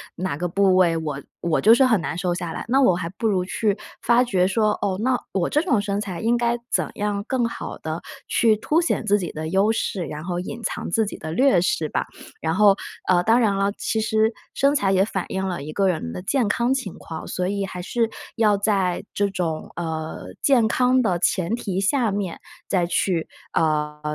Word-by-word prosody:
哪 180 -5 -3
个 175 - -1
部 190 +2 +3
位 175 -3 +4
我 150 -4 -3 0.2
我 170 -2 +1
就 225 +2 +7
是 255 - +5
很 225 -5 +3
难 165 - -4
瘦 180 0 0
下 175 -2 -4
来， - - -5
那 270 +3 +4
我 190 -9 +5
还 170 -1 -3
不 210 +5 -2
如 190 -4 +1
去 205 +2 0 0.2
发 240 +1 +4
觉 190 -7 +2
说， 215 +2 +2
哦， 190 -2 0
那 255 0 +2 0.2
我 185 -3 0
这 300 - +2
种 250 - +2
身 200 0 -2
材 190 -5 -5
应 235 +2 +2
该 235 0 +1
怎 - - +1
样 205 -1 -1
更 255 -2 +1
好 230 - -5
地 160 +1 -4 0.3
去 225 -2 +4
凸 300 +9 +1
显 335 -8 0
自 205 -1 +3
己 175 -4 -5
的 155 +1 -4
优 195 +4 +3
势， 190 -5 -2
然 150 +1 -6
后 175 0 -3
隐 220 +6 -6
藏 - - -3
自 220 +5 +2
己 205 - -6
的 160 0 -6
劣势 180 - +2
吧。 - - -1 0.3
然 160 0 -1
后， 205 0 +6 0.4
呃， 180 -1 +5
当 225 +4 +4
然 215 -4 +3
了， 200 +1 +1
其 220 - -1
实， 220 0 +2 0.2
身 280 +1 +3
材 200 -9 +2
也 190 0 +4
反 195 -3 -3
映 190 0 -2
了 180 -5 -3
一 155 +2 -7
个 195 +1 +2
人 155 - -2
的 - - -5
健 235 +4 +1
康 235 +4 +1
情 255 -9 -3
况， 160 -1 -8
所 180 0 -2
以 200 0 -1
还 180 -2 -6
是， 230 +5 0 0.3
要 215 -2 +4
在 195 -3 0
这 205 - +1
种 170 -5 -3
呃， 160 -2 -4
健 260 -5 +4
康 255 +1 +3
的 185 -7 +1
前 185 +2 +1
提 195 -5 -2
下 230 +2 +2
面， 195 -4 -3 0.3
再 180 -3 +2
去， 170 -1 0 0.3
呃， 150 -1 0
195 Hz, 235 characters per minute, -23 LUFS, 175-225 Hz, 0.4 s, 就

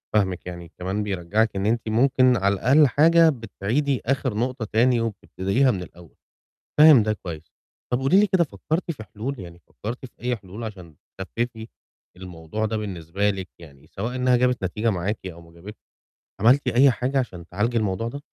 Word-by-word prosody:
فاهمِك 95 -4 0
يعني، 85 -2 -8
كمان 95 +4 -2
بيرجّعِك 100 +3 0
إن 95 0 -2
أنتِ 110 0 0
ممكن 130 +2 +3
على 100 -1 0
أقل 140 +4 +5
حاجة 165 +5 +5
بتعيدي 125 +2 -2
آخر 130 -1 0
نقطة 125 0 -2
تاني 120 +3 +2
وبتبتديها 115 +3 0
من 90 -3 -4
الأول، 85 -1 -15 0.6
فاهم 150 -7 +8
ده 110 - 0
كويس، 85 -6 -9 0.4
طَب 125 - +1
قولي 135 +9 +4
لي 210 - +4
كده 190 -3 +3
فكّرتي 165 +3 -3
في 110 -7 -10
حلول، 115 +7 -6
يعني 85 -2 -10
فكّرتِ 120 +5 -7
في 125 - -17
أي 125 +1 0
حلول 100 +1 -10
عشان 90 -8 -9 0.2
تخفِّفي 115 +3 -4 0.5
الموضوع 90 +3 -5
ده 110 0 -2
بالنسبة 100 -1 -2
لِك 95 -2 -4
يعني 70 -5 -15
سواء 115 +6 -5
إنها 125 0 +3
جابت 125 -3 +1
نتيجة 105 +5 0
معاكِ 100 +2 -2
أو 85 -2 -8
ما 85 0 -17
جابتش، 95 +6 -11 0.6
عملتِ 125 +5 +4
أي 130 +3 +5
حاجة 130 +3 -1
عشان 90 -10 -4
تعالجي 115 +6 -1
الموضوع 105 0 -1
ده؟ 140 +4 -7
110 Hz, 175 wpm, -23 LUFS, 95-125 Hz, 0.6 s, فاهم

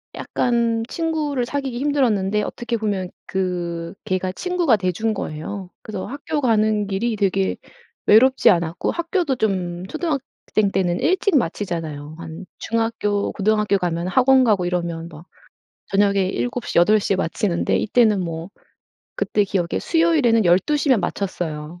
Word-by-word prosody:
약간 235 -2 0
친구를 305 -6 -1
사귀기 270 -2 -3
힘들었는데 225 -8 +1
어떻게 240 +2 -3
보면 200 -4 -2 0.2
그 175 -2 -3
개가 185 0 -1
친구가 350 - +1
돼 185 -2 0
준 220 +5 -1
거예요. 185 +1 -5
그래서 205 -4 -6
학교 290 +2 -3
가는 215 -4 +2
길이 215 +4 -1
되게 195 -2 +1 0.5
외롭지 260 +5 +6
않았고 170 -3 +1
학교도 340 -4 -1
좀 185 -5 -1
초등학생 275 - -2
때는 180 -2 +1
일찍 370 -1 +2
마치잖아요. 165 - -3
한 165 +2 -8
중학교, 225 -3 -1
고등학교 210 0 +1
가면 175 -1 -2
학원 260 +5 +5
가고 205 -7 +2
이러면 170 -2 -2
뭐 155 - -12 0.7
저녁에 200 -1 +3
7:00, 245 +5 -2
8:00 205 +3 +4
에 - - +2
마치는데 175 0 0
이때는 215 -2 +3
뭐 165 -1 -4 0.7
그때 210 - +1
기억에 185 -3 -1
수요일에는 310 - +3
12:00 240 - +2
면 255 -6 +4
마쳤어요. 170 -5 -4
205 Hz, 295 characters per minute, -21 LUFS, 180-245 Hz, 0.7 s, 외롭지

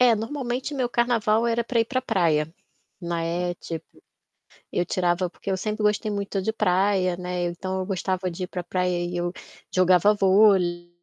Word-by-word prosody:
É, 245 -2 +6
normalmente 250 +4 -3
meu 255 -3 0
carnaval 235 -2 +2
era 235 0 +1
para 235 -1 +1
ir - - +3
para 255 +2 -2
praia, 165 -9 +1 0.5
né. 170 +1 -2
Tipo, 165 -1 -7 0.9
eu 175 - +1
tirava 180 0 0
porque 195 - -7
eu 190 - +1
sempre 215 +3 -3
gostei 210 0 +1
muito 200 -1 -2
de 220 +4 -1
praia, 185 -2 +2
né, 180 0 -3
então 185 +2 -3
eu 185 - -3
gostava 185 -1 -2
de 175 +2 -5
ir - - -4
para 180 - -4
praia 180 0 -1
e 175 0 -4
eu 175 0 -1 0.4
jogava 185 +2 +5
vôlei 190 -3 +3
185 Hz, 175 wpm, -25 LUFS, 175-215 Hz, 0.9 s, É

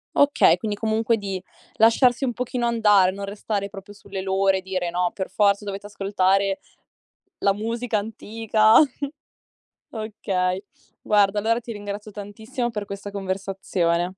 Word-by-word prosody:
Okay, 285 0 +5
quindi 215 -3 -3
comunque 225 +2 +1
di 195 -2 -4 0.3
lasciarsi 240 +3 +4
un 245 - -1
pochino 245 0 -2
andare, 210 -5 +4
non 200 +1 -7
restare 200 0 -3
proprio 200 +1 -10
sulle 200 -1 -7
loro 190 0 +2
e - - -4
dire: 185 -2 -2
"No, 175 0 0
per 190 - -4
forza 200 0 +2
dovete 200 0 -6
ascoltare 195 -1 +1 0.8
la 200 - +3
musica 230 +2 -2
antica." 220 +1 +1 1.2
Okay. 195 -4 -2 0.4
Guarda 205 -1 +3
allora 230 +3 +1
ti 235 0 -8
ringrazio 205 +1 -6
tantissimo 220 +5 -4
per 210 -2 -4
questa 200 0 -7
conversazione. 190 -3 -1
205 Hz, 135 wpm, -23 LUFS, 195-220 Hz, 1.2 s, Okay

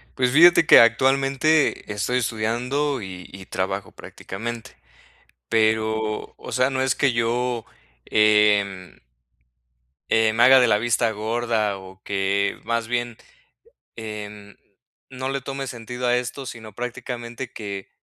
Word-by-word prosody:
Pues, 125 -1 +1
fíjate 170 +3 +6
que - - +8
actualmente 135 +4 +2
estoy 110 +5 -1
estudiando, 125 +5 -1
y 90 -2 -9
y 95 -1 -11
trabajo 95 +1 -4
prácticamente, 115 +4 -8 0.8
pero, 110 -1 0
o - - -10
sea, 130 +1 +2
no 130 0 -1
es 130 -1 +1
que 135 -3 +1
yo, 115 0 -1 0.4
em 105 -3 +2 1.1
eh, 110 -1 +3
me 115 - +1
haga 130 +1 +8
de 125 - +5
la 105 -1 +3
vista 115 0 +1
gorda 110 -1 -1
o 95 0 -14
que 100 0 -1
más 115 0 -2
bien, 120 -1 -2 0.8
em, 105 -2 -8 0.5
no 130 0 -5
le 140 0 -2
tome 135 +1 -5
sentido 125 +1 -6
a 120 0 +3
esto, 125 +3 -6
sino 110 -4 -9
prácticamente 120 0 -6
que, 100 -3 -7
115 Hz, 130 wpm, -23 LUFS, 105-125 Hz, 1.1 s, que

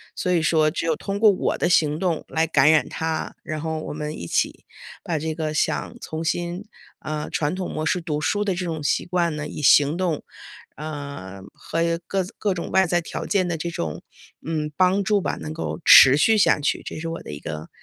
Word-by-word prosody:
所 180 - -1
以 170 -2 +3
说 155 -1 +3
只 165 - -3
有 160 -2 +1
通 195 +5 -4
过 215 -1 +6
我 185 - -1
的 - - +1
行 150 -3 +3
动 175 -4 -1
来 160 +1 +1
感 150 -1 +4
染 155 - +3
他， 160 -1 -3
然 155 -1 -5
后 160 0 -3
我 155 - -6
们 150 0 -5
一 85 - -7
起 - - -1 0.4
把 165 -3 -2
这 160 +1 -3
个 155 -1 -3
想 - - -1
重 160 +1 -5
新， 175 +4 -2 0.4
呃， 155 -1 -4
传 150 +3 -1
统 185 -1 -4
模 155 - -3
式 180 - +1
读 155 -3 -3
书 205 +9 0
的 195 - 0
这 180 +1 -3
种 160 -3 -4
习 - - 0
惯 170 -3 0
呢， 150 0 -4
以 - - -8
行 145 +3 +5
动， 175 -5 -1 0.5
呃， 140 -11 -7
和 165 - -5 0.3
各 195 -1 -1
各 205 -2 0
种 175 - -5
外 190 0 +4
在 175 0 +1
条 170 - -6
件 190 -3 +1
的 170 -2 -2
这 170 +2 -4
种， 80 - -4 0.4
嗯， 155 -2 -2
帮 190 +2 +3
助 205 +1 +2
吧， - - -2
能 155 - -6
够 160 +2 -4
持 130 0 +9
续 220 +9 +4
下 200 - +4
去， 145 - -1
这 - - -6
是 165 - -5
我 165 - -6
的 - - -8
一 75 - -7
个 80 -1 -7
160 Hz, 240 characters per minute, -23 LUFS, 150-180 Hz, 0.5 s, 持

